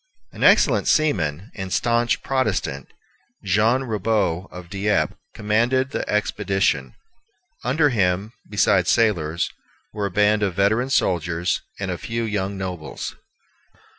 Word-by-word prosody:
An - - -6
excellent - - +5
seaman 95 - +1
and 95 -2 -6
stanch 120 +2 +1
Protestant, 130 -1 -1 0.6
Jean 105 +6 +2
Ribaut 105 -5 -1
of 90 -1 -9
Dieppe, 100 +3 0 0.2
commanded 120 +6 +1
the - - -3
expedition. 95 -10 0 0.7
Under 145 +5 +2
him, 100 -2 0 0.2
besides 100 -2 +2
sailors, 85 -8 +1 0.4
were 105 -1 -2
a - - -5
band 105 +2 +2
of 95 -4 0
veteran 110 +6 +2
soldiers, 85 - 0 0.2
and 95 -2 -2
a 90 - -4
few 115 0 -3
young 100 -3 -2
nobles. 90 -5 -5
105 Hz, 120 wpm, -22 LUFS, 90-115 Hz, 0.7 s, excellent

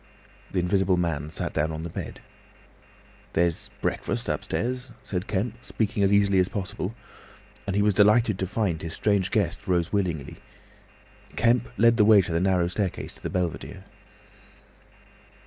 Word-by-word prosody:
The - - -3
Invisible 95 +1 +2
Man 80 -4 -1
sat 80 - -3
down 80 +2 0
on 80 0 -5
the 85 - -5
bed. - - -6 1.1
"There's 85 -1 +1
breakfast - - -2
upstairs," 125 +2 -2
said 95 +2 -3
Kemp, 110 +5 -2
speaking 110 -4 -1
as 100 0 +4
easily 100 -1 +4
as 90 - +2
possible, 100 +1 -4 0.7
and 100 - -1
he 100 - +3
was 105 0 +3
delighted 105 0 +4
to 95 - -1
find 95 -5 -1
his 85 -1 -5
strange 100 -3 +1
guest 105 0 -1
rose 90 -1 +1
willingly. 85 -8 -1 1.0
Kemp 120 +1 +2
led 115 +2 +5
the 105 - +5
way 110 0 +7
up 95 - +5
the 85 0 0
narrow 90 -2 +2
staircase 95 +1 -3
to - - -15
the - - -3
belvedere. 90 -3 -3
95 Hz, 155 wpm, -26 LUFS, 90-105 Hz, 1.1 s, way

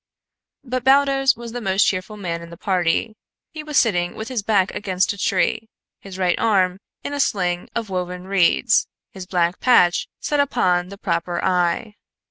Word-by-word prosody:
But 255 -1 -3
Baldos 270 0 +4
was 235 -1 -9
the 245 +1 -5
most 195 -1 +2
cheerful 200 +2 -2
man 170 -4 -4
in 170 - -10
the 170 - -11
party. 185 +4 0 0.4
He 315 - -7
was 300 -1 -3
sitting 175 -6 0
with 220 +3 -6
his 250 -4 -2
back 200 -3 +1
against 190 0 0
a - - -12
tree, 220 +4 0 0.3
his 195 -2 -10
right 180 -2 +1
arm 190 -4 +2 0.2
in 285 - -4
a 285 - -3
sling 180 -8 0
of 225 -4 -3
woven 180 -1 -4
reeds, 190 -3 +3 0.2
his 190 -2 -9
black 175 -1 0
patch 180 -9 +3
set 295 - -1
upon 180 -10 +1
the 200 - -10
proper 175 -2 -2
eye. 180 +4 0
195 Hz, 175 wpm, -21 LUFS, 180-230 Hz, 0.4 s, Baldos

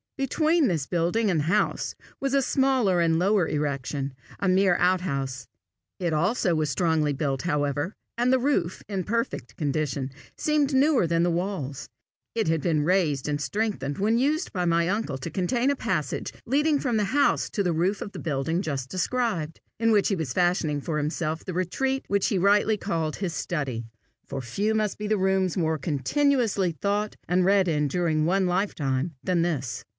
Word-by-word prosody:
Between 310 +3 +2
this 160 -8 0
building 180 +6 +1
and 165 - +1
the - - -3
house 205 +6 0 0.2
was 275 0 0
a 275 - +3
smaller 255 -10 +2
and 165 -1 +3
lower 190 0 +2
erection, 140 -2 -2 0.3
a 200 - 0
mere 185 -1 +4
out 180 +1 +3
house. 135 -6 -3 0.5
It 175 -3 -1
also 180 +3 +1
was 155 -2 0
strongly 155 0 +1
built, 135 -2 -2
however, 145 +2 -1 0.2
and 245 +1 +3
the 260 - +5
roof, 250 -9 0
in 195 -3 -2
perfect 215 - -3
condition, 140 -2 -1 0.3
seemed 295 -2 +1
newer 270 - +4
than 165 0 +2
the 175 - +2
walls: 170 -6 -3 0.5
it 225 -5 0
had 160 -1 +1
been 155 -3 +1
raised 155 -6 +1
and 145 0 -1
strengthened 200 -9 -2
when 215 +4 +2
used 305 +6 0
by 180 -3 -1
my 170 0 +2
uncle 200 -9 -1
to 165 - -5
contain 235 - +1
a - - 0
passage 155 - -2
leading 290 +3 +2
from 245 -5 0
the 210 - +2
house 290 - +3
to 205 - 0
the 175 -2 +1
roof 180 +5 +1
of 200 - -5
the - - -8
building 160 +3 -1
just 135 -7 -3
described, 185 -5 -1 0.2
in 225 0 +3
which 205 -2 +4
he 200 - +1
was 155 -8 -3
fashioning 175 -4 +1
for 155 +1 -2
himself 155 +1 -2
the 185 - -4
retreat 265 +10 -1
which 200 -1 +1
he 200 - 0
rightly 205 +3 +3
called 165 -6 -2
his 185 -4 -3
study, 135 -12 -3 0.4
for 135 - -4
few 200 - -1
must 215 -2 -1
be 210 - -3
the 215 0 +2
rooms 190 -2 +1
more 160 -2 +1
continuously 205 - +1
thought 205 +5 -1
and 180 0 +2
read 195 -1 +4
in 150 -3 +1
during 155 0 +1
one 190 +3 +2
lifetime 160 -6 -1
than 180 -2 +1
this. 145 -8 -2
180 Hz, 185 wpm, -26 LUFS, 155-210 Hz, 0.5 s, the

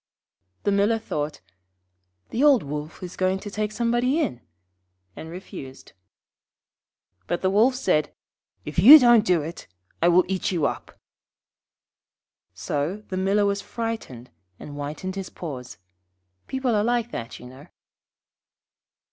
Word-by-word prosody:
The 205 - +1
Miller 200 +3 +2
thought, 150 - -4 0.9
'The 245 - 0
old 285 -5 +5
Wolf 150 +4 -6
is 180 0 -7
going 185 0 +1
to 205 +1 -8
take 210 +1 -2
somebody 240 +5 +1
in,' 125 - -2 0.7
and 160 - -9
refused. 155 -7 -10 1.3
But 175 - -2
the 190 - +2
Wolf 230 +6 +4
said, 155 -12 0 0.5
'If 150 +3 -3
you 265 - +11
don't 240 -5 +5
do 180 -7 +2
it, 165 +3 -8 0.3
I 170 - +4
will 175 +1 +5
eat 190 0 -1
you 165 -5 0
up.' - - -4 1.6
So 160 +9 -3
the 185 - -3
Miller 195 +2 +2
was 200 0 0
frightened, 225 - -6 0.3
and - - -9
whitened 150 +6 -5
his 195 -1 -5
paws. 130 -7 -8 0.7
People 265 -2 -1
are 210 -1 +2
like 240 0 0
that, 115 -1 -6
you - - -12
know. 130 +5 -13
190 Hz, 135 wpm, -24 LUFS, 150-225 Hz, 1.6 s, you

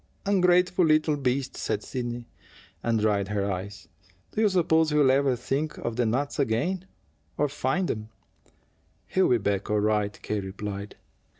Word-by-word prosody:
"Ungrateful 180 -2 +3
little 155 -1 +3
beast!" 135 -1 -1
said - - -2
Sidney, 120 -2 -4 0.5
and 115 -1 +1
dried 105 -2 +1
her 100 -1 -1
eyes. 100 +2 -6 0.4
"Do 215 - -1
you 215 - +5
suppose 160 -4 +3
he'll 150 -3 +4
ever 135 -1 +3
think 140 +5 -2
of 120 - -3
the 120 -1 +1
nuts 140 +7 -1
again, 170 +10 0 0.5
or 150 - +2
find 145 +5 -1
them?" 110 0 -4 1.0
"He'll 185 -10 +3
be 100 -2 0
all 105 0 +2
right," 105 -1 0
K. 105 - -1
replied. 100 +1 -6
125 Hz, 145 wpm, -27 LUFS, 105-155 Hz, 1.0 s, you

